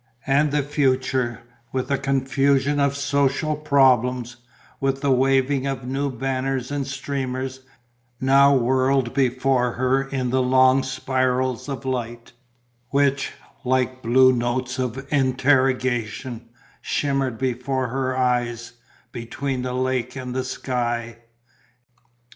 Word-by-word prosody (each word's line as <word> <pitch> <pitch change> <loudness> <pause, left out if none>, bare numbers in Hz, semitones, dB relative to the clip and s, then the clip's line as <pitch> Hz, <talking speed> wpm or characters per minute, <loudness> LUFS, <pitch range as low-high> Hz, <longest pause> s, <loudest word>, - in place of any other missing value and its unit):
And 140 +2 +3
the 145 -1 +1
future, 130 -4 0 0.3
with 130 +1 -3
a 140 - +2
confusion 135 +1 +1
of 140 0 +1
social 140 +2 0
problems, 125 -4 +2 0.4
with 135 0 -1
the 140 -2 +1
waving 135 +1 +2
of 135 -2 -4
new 135 +2 -1
banners 130 0 -2
and 140 -2 -2
streamers, 135 -1 -4 0.6
now 135 +1 +5
whirled 130 0 +1
before 130 -2 +1
her 130 +2 +1
in 135 -2 -3
the 130 0 +2
long 130 +1 +4
spirals 130 -1 -1
of 135 -1 -5
light, 120 -2 -4 0.6
which, 140 0 +1 0.3
like 130 0 0
blue 130 +2 +5
notes 125 +2 -2
of 130 +1 -3
interrogation, 130 -3 0 0.3
shimmered 135 -4 -1
before 130 0 -2
her 130 0 -2
eyes, 120 -2 -1 0.4
between 130 +2 -4
the 125 0 -3
lake 130 -1 -1
and 125 -2 -5
the 130 0 -1
sky. 120 -3 -3
130 Hz, 115 wpm, -23 LUFS, 125-135 Hz, 0.6 s, now